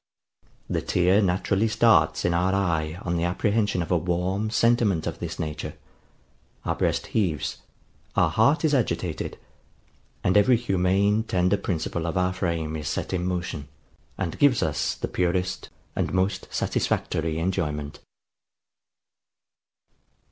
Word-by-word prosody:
The - - -1
tear 90 +3 +3
naturally 95 +3 +1
starts 115 +1 +3
in 85 - +2
our 90 +3 +2
eye 80 -4 0
on 85 -1 -1
the 85 - 0
apprehension 100 +1 +1
of 85 - -7
a 90 - +4
warm 90 +5 -1
sentiment 115 -7 +2
of - - -4
this - - -5
nature: 75 -1 -4 0.9
our - - +1
breast - - 0
heaves, 90 -9 0 0.6
our - - +3
heart 140 +9 +3
is 150 - +2
agitated, 125 -6 -1 0.9
and 95 - +2
every 115 +4 +5
humane 100 -1 +2
tender 90 -3 +1
principle 85 -3 -2
of 85 - -2
our 90 0 +1
frame 85 -4 -2
is 75 -3 -5
set - - -3
in 90 -1 -1
motion, 85 -5 -3 0.5
and 85 - -3
gives 140 -4 +4
us 75 -2 -1
the - - -4
purest 90 +1 -1 0.3
and - - -1
most 95 +1 0
satisfactory 80 -1 -1
enjoyment. 75 -4 -2
90 Hz, 135 wpm, -25 LUFS, 85-100 Hz, 0.9 s, every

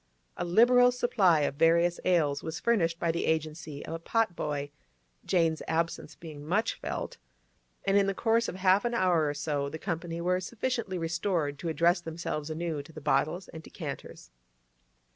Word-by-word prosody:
A - - -3
liberal 245 +7 +5
supply 200 -10 +3
of 140 -1 -1
various 170 +2 +3
ales 155 -6 +2
was 160 0 -5
furnished 170 -8 +1
by 170 -1 0
the 170 - -2
agency 155 -2 -2
of - - -6
a 165 - -4
pot 220 +2 0
boy 145 -2 -3 0.5
(Jane's 165 -3 +1
absence 165 -1 -2
being 155 -3 -10
much 205 +9 0
felt), - - -5 0.7
and 195 - +2
in 200 -1 +4
the 195 - -1
course 230 +2 +2
of - - -6
half 190 +1 +3
an 240 0 -1
hour 175 -7 +3
or 145 - -3
so 145 -1 -2
the 155 - -6
company 165 +1 -4
were 180 +2 +1
sufficiently 225 0 -3
restored 165 -3 -1
to 165 - -3
address 170 +2 +2
themselves 160 -2 -4
anew 160 -1 -3
to 160 - -14
the 155 - -9
bottles 155 +5 0
and 160 - -9
decanters. - - -8
170 Hz, 175 wpm, -29 LUFS, 155-185 Hz, 0.7 s, liberal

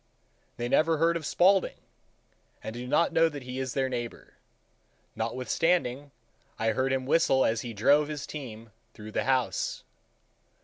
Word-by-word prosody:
They 120 - -2
never 160 +5 +3
heard 165 +2 +2
of 160 -3 -3
Spaulding, 190 +1 +3 0.9
and 110 - -5
do 120 +1 -6
not 150 +5 +2
know 165 0 +4
that 145 -3 -8
he 125 +1 -6
is 130 -2 -3
their 135 -1 +1
neighbor,—notwithstanding 125 +3 -4 0.5
I 115 - +1
heard 130 +2 0
him 130 -1 -1
whistle 135 -2 +3
as 110 0 +1
he 120 - -6
drove 145 +8 +4
his 150 -2 -5
team 115 -6 -8 0.2
through 110 0 -9
the - - -1
house. 130 -2 0
130 Hz, 145 wpm, -28 LUFS, 120-155 Hz, 0.9 s, know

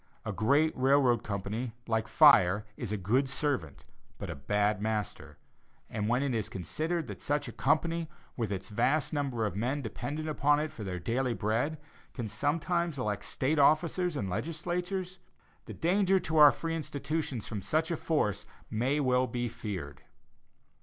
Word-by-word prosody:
A 110 - -2
great 140 +10 +2
railroad 130 -3 +3
company, 105 +4 -3
like 110 -1 0
fire, 105 - +6
is 115 -4 -5
a 105 - 0
good 120 +9 +1
servant, 135 - -2 0.3
but - - -5
a - - -5
bad 105 +8 0
master; 105 -2 -3 0.5
and 105 -1 -2
when 125 +3 +2
it 140 -3 0
is 110 -3 -1
considered 155 - -2
that - - -8
such 145 0 -1
a - - -5
company, 165 +1 0 0.3
with 115 -4 -2
its 95 -1 -4
vast 130 +9 +1
number 135 -6 -1
of 100 -4 -3
men 130 +7 -1
dependent 145 +7 -4
upon 145 -1 +2
it 155 +1 -2
for 110 - -8
their 95 -2 -4
daily 120 +7 -1
bread, 115 +10 0 0.4
can 120 -4 -3
sometimes 165 - -1
elect 105 -5 -2
State 145 +4 0
officers 165 +4 +3
and 100 - -2
legislatures, 175 - -3 0.5
the - - -8
danger 190 +3 +3
to 160 -3 -1
our 150 -2 +9
free 165 0 -3
institutions 145 -5 -3
from 105 -3 -4
such 155 - 0
a - - +1
force 150 - -1 0.2
may 125 +7 +1
well 130 -2 +2
be 120 +1 -2
feared. 95 -11 -6
130 Hz, 165 wpm, -30 LUFS, 110-155 Hz, 0.5 s, our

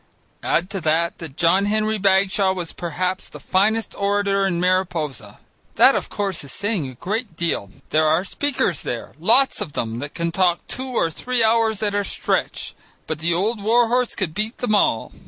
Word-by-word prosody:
Add 180 +3 0
to 195 -2 -4
that 165 +2 0
that 160 -4 -9
John 180 +4 +3
Henry 215 +1 0
Bagshaw 195 0 +3
was 175 -3 -5
perhaps 180 +3 -3
the - - -11
finest 215 +3 +1
orator 200 -1 +1
in 175 -3 -1
Mariposa. 175 - -1 0.4
That, - - +7
of - - -2
course, 195 -6 -3
is 140 - -7
saying 200 - -2
a 130 - -10
great 210 - -4
deal. 165 -12 -2 0.2
There 155 0 +3
are 160 +4 +2
speakers 285 +7 -1
there, - - -5
lots 270 0 +5
of 145 - -5
them 115 0 -3
that 145 +2 -7
can 170 0 -2
talk 175 -1 +1
two 260 +1 -5
or 165 - +1
three 250 +7 0
hours 220 -1 +2
at 205 -1 0
a 205 0 0
stretch, - - -2 0.3
but 160 -1 -4
the 170 +2 0
old 210 +5 -1
war 230 +3 +3
horse 250 0 +1
could 190 -6 -2
beat 215 +5 -3
them 245 -4 -1
all. 115 - +2
190 Hz, 190 wpm, -21 LUFS, 165-215 Hz, 0.4 s, That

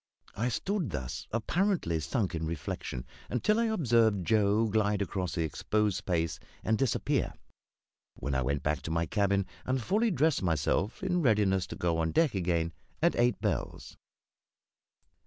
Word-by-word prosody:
I 120 +4 0
stood 185 - -1
thus, 65 -1 -5
apparently 115 - 0
sunk 90 - -1
in 80 -1 -2
reflection, 70 -5 -4 0.2
until 210 - +2
I 235 - +3
observed 115 - +2
Joe 105 +1 +3
glide 105 -1 +1
across 95 -2 -2
the 85 - +1
exposed 105 +6 0
space 85 -3 -1 0.2
and 110 - +2
disappear; 130 0 0 0.8
when 70 +2 -3
I 65 - +1
went 70 +2 -1
back 75 0 0
to - - -6
my 85 +1 +1
cabin 100 0 +1 0.2
and 130 +1 0
fully 210 - +1
dressed 160 -4 +2
myself, 85 - 0
in 180 -2 +1
readiness 105 - +3
to - - -7
go 85 -1 0
on 80 -1 0
deck 165 -4 +3
again 85 -3 0 0.3
at 170 +2 +3
eight 120 0 +2
bells. - - -3
100 Hz, 155 wpm, -30 LUFS, 85-125 Hz, 0.8 s, I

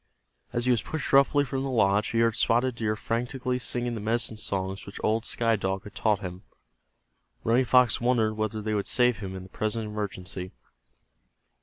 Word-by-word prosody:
As 120 0 -1
he 125 - +4
was 120 -3 +2
pushed 160 +1 -4
roughly 140 +1 +5
from 135 0 -3
the 135 - -2
lodge 105 -4 +3
he 115 - +1
heard 115 -1 +3
Spotted 120 +1 +2
Deer 110 -2 -1
frantically 125 +3 -2
singing 120 0 -2
the 110 - -4
medicine 115 +1 0
songs 95 -2 -3
which 100 - -9
old 110 +2 +1
Sky 115 -1 +1
Dog 95 -1 -2
had 105 - -11
taught 105 -2 +1
him. 90 -1 -6 1.0
Running 120 +3 +3
Fox 125 -1 +4
wondered 120 -3 +2
whether 110 0 -3
they 110 0 -1
would 100 -1 -1
save 125 -2 +3
him 95 -2 -6
in 95 - -7
the 95 - -13
present 110 +3 -2
emergency. 95 -3 -5
110 Hz, 185 wpm, -27 LUFS, 105-120 Hz, 1.0 s, roughly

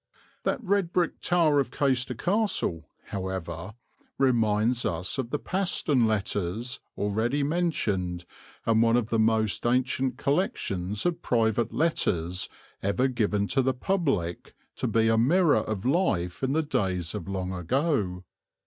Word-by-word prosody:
That 250 - 0
red 195 -3 +1
brick 175 -2 0
tower 165 -5 +3
of 135 - 0
Caister 130 -2 0
Castle, 180 - -1 0.2
however, 95 0 -5 0.4
reminds 120 -2 +2
us 85 +9 -2
of 120 -3 -2
the 150 - -1
Paston 160 - +1
Letters, 110 +3 -2 0.2
already 110 +8 0
mentioned 105 - -1 0.4
and 115 -1 +3
one 115 +1 +4
of 120 -2 -1
the 115 - +1
most 110 -1 +2
ancient 130 +1 +1
collections 120 - -1
of 175 -1 0
private 115 -1 +1
letters 90 - 0 0.3
ever 100 +7 +1
given 105 -5 0
to 135 - +2
the 130 0 +1
public 135 - -1 0.2
to - - -1
be 115 0 +2
a 115 0 +3
mirror 160 +5 +4
of 110 -1 -4
life 90 - +1
in 135 +1 0
the 160 +1 +2
days 90 - -1
of 85 - -5
long 95 -1 -3
ago. 95 - 0
115 Hz, 140 wpm, -27 LUFS, 95-145 Hz, 0.4 s, one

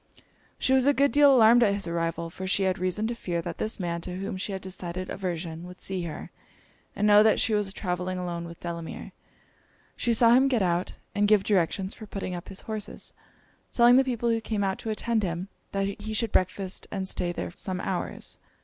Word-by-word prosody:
She 260 - +2
was 265 0 +4
a 285 - +5
good 280 +1 +3
deal 290 -1 +7
alarmed 240 -1 +7
at 200 -4 +4
his 200 - -3
arrival: 170 0 -2
for 190 +2 -6
she 195 +1 +2
had 185 -1 +1
reason 185 +4 -1
to 235 - -1
fear, 175 -7 -3
that 170 -1 -6
this 220 0 -2
man, 170 -2 -2
to 180 +1 -5
whom 195 +2 -4
she 185 +2 -3
had 190 -1 -4
a - - -19
decided 185 -1 -5
aversion, 170 -2 -4
would 180 0 -12
see 185 -2 -3
her, 160 - -7 0.6
and 210 - 0
know 210 0 +7
that 220 0 +4
she 225 - +2
was 205 -2 0
travelling 185 -1 -3
alone 175 -1 -4
with 170 0 -10
Delamere. 170 -1 -6 0.8
She 240 - 0
saw 230 0 +5
him 260 +2 +5
get 245 -7 +2
out, 175 0 0 0.2
and 205 0 +2
give 210 -2 +5
directions 190 0 +1
for 215 - -10
putting 195 -2 -4
up 175 -1 -7
his 195 - -6
horses, 215 -2 -6 0.6
telling 240 0 +6
the 265 - +6
people 240 -2 0
who 225 0 0
came 215 -2 -2
out 190 -1 -1
to 225 - -5
attend 220 +1 0
him 180 0 -3 0.2
that 195 0 0 0.2
he 220 +1 -4
should 225 0 0
breakfast 185 +1 -1
and 190 -2 -3
stay 175 -2 -1
there 175 - -4
some 185 +1 -4
hours. 190 -2 -3
195 Hz, 220 wpm, -27 LUFS, 180-220 Hz, 0.8 s, deal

